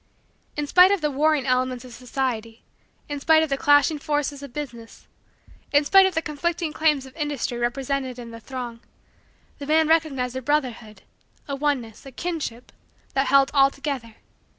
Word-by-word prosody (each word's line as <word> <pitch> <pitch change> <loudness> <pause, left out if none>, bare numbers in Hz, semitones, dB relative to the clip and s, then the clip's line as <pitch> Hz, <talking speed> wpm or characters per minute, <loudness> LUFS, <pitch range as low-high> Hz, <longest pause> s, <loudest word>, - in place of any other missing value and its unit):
In 295 - -1
spite 360 +5 +6
of 400 -3 +1
the 300 -1 0
warring 295 0 +2
elements 255 -1 0
of 250 - -11
society; 235 -3 -4 0.4
in 290 -1 -4
spite 315 +2 +4
of 315 - -2
the 275 - +1
clashing 290 +2 +4
forces 290 -1 -2
of 280 -3 -9
business; 240 -5 -8 0.7
in 290 0 +4
spite 385 +5 +6
of 375 - -4
the 325 - 0
conflicting 315 +2 -2
claims 300 -4 +2
of 265 - -14
industry 290 -6 -3
represented 260 +1 -2
in 235 -1 -9
the 230 - -9
throng; 245 -1 -7 0.8
the 280 - -7
man 315 +1 +3
recognized 280 -6 +1
a 260 - -3
brotherhood, 240 -7 -2 0.4
a 280 - -3
oneness, 270 -6 -2
a - - -9
kinship, 280 -5 -5 0.4
that 270 0 +1
held 275 0 +4
all 275 -1 +5
together. 275 -6 -5
275 Hz, 170 wpm, -24 LUFS, 250-300 Hz, 0.8 s, spite